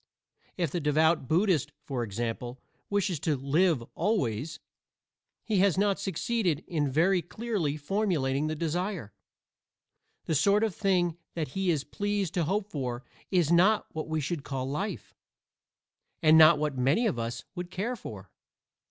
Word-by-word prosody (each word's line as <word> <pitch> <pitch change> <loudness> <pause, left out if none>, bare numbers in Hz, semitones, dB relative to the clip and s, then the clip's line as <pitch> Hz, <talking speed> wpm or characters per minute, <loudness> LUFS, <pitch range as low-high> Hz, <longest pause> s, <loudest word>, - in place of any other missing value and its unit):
If 170 -6 0
the 175 - -1
devout 155 -1 +2
Buddhist, 160 - +2
for 135 -5 -3
example, 120 +3 -4 0.3
wishes 200 -5 0
to 155 -1 0
"live 145 +1 +2
always," 155 - -1 0.8
he 210 -4 +1
has 190 -2 +3
not 200 0 +2
succeeded 195 -3 -1
in 150 -5 -1
very 175 +7 +3
clearly 185 -7 -2
formulating 150 -5 0
the 155 - -2
desire. 170 - -3 1.1
The - - -1
sort 200 +8 +3
of 220 -4 0
thing 175 -5 +1 0.2
that 160 -4 -2
he 190 +6 -1
is 155 -5 +1
pleased 205 -2 -2
to 175 -3 +1
hope 200 +4 -1
for 125 -4 -3 0.3
is 175 -5 +2
not 190 +5 +3
what 160 0 -4
we 160 0 -1
should 150 +1 -3
call 130 -2 -3
life, 190 +10 -4 1.1
and 155 0 +7
not 160 -1 +8
what 150 -2 -1
many 140 - +3
of 195 - 0
us 115 +1 -4
would 180 -2 -6
care 210 +7 -2
for. 100 - -9
165 Hz, 150 wpm, -29 LUFS, 140-195 Hz, 1.1 s, not